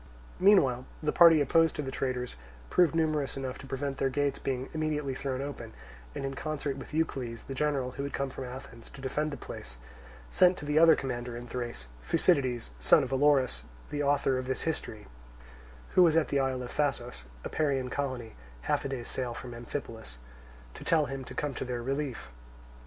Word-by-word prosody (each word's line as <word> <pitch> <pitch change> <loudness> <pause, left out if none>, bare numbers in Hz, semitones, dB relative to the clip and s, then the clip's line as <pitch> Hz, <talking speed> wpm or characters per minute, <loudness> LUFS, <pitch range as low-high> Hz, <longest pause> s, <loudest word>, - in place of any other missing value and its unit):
Meanwhile 140 -11 +5 0.2
the 150 - +2
party 165 -3 +7
opposed 165 +3 +4
to 150 - -2
the 135 - -4
traitors 125 -2 -2 0.4
proved 175 -3 +4
numerous 155 -4 0
enough 130 -1 -4
to 135 - -10
prevent 135 0 -3
the 135 - +2
gates 145 +1 0
being 130 0 -2
immediately 150 -3 -1
thrown 135 0 -3
open, 120 -6 -7 0.4
and - - -3
in 135 - -3
concert 145 -1 -3
with 135 - -9
Eucles, 135 -7 -2
the 135 - -5
general, 135 -2 0
who 140 - -5
had 140 - -3
come 135 0 -2
from 130 - -6
Athens 125 -2 -9
to - - -13
defend 145 +3 -1
the 140 - -5
place, - - -9 0.5
sent 180 0 +5
to - - -7
the 150 +1 +3
other 165 -1 +8
commander 120 -2 -4
in 120 - -7
Thrace, 120 - -5 0.2
Thucydides, 125 - +1
son - - +5
of - - -4
Olorus, 135 - +3 0.3
the 145 - -1
author 140 -2 +2
of 130 - -5
this 130 - -1
history, 110 -9 -3 0.8
who - - +4
was 165 -2 +6
at 160 - +2
the 140 - +2
isle 130 -1 0
of 120 - -7
Thasos, 125 - -1 0.2
a - - -4
Parian 135 -5 0
colony, 130 -5 -3 0.3
half - - 0
a - - -3
day's 130 -3 -4
sail 125 -2 -3
from 120 0 -7
Amphipolis, 115 - -7 0.6
to - - -10
tell 160 -2 +3
him 135 -1 -5
to - - -9
come 145 -2 -1
to - - -4
their 125 -2 -3
relief. 135 - -3
135 Hz, 195 wpm, -30 LUFS, 125-150 Hz, 0.8 s, other